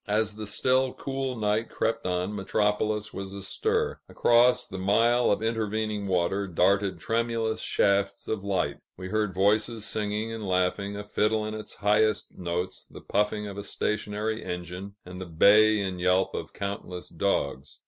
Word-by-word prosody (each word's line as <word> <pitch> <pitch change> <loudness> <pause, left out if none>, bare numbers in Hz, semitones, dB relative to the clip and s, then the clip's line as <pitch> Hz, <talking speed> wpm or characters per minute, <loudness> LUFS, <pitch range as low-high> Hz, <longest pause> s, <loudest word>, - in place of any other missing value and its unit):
As 105 +1 +1
the 105 0 -6
still, 130 +5 +1
cool 135 -1 -3
night 110 +1 0
crept 115 -2 -1
on, 90 +3 -1
Metropolis 105 +1 0
was 95 0 -6
astir; 445 - -1
across 125 +1 +4
the 95 - -7
mile 115 +5 +3
of 105 - +1
intervening 110 -2 -1
water, 95 +2 +1
darted 95 +1 +2
tremulous 115 +1 -1
shafts 100 0 +1
of 110 -3 -2
light; 95 -7 0 0.2
we 95 0 -6
heard 105 -1 0
voices 105 +4 +1
singing 105 +1 -2
and 110 -3 -5
laughing, 95 +2 0
a 105 - -5
fiddle 105 +1 +1
in 110 - -4
its 110 -1 -7
highest 105 +1 +1
notes, 90 +1 -4
the - - -11
puffing 105 0 0
of 100 -1 -6
a - - -5
stationary 105 +2 -2
engine, 90 +2 -6
and 90 +1 -8
the 95 - -6
bay 105 +6 +5
and 95 -3 -3
yelp 90 +1 +2
of - - -5
countless 100 -3 -5
dogs. 80 -6 -2
105 Hz, 160 wpm, -27 LUFS, 95-110 Hz, 0.2 s, bay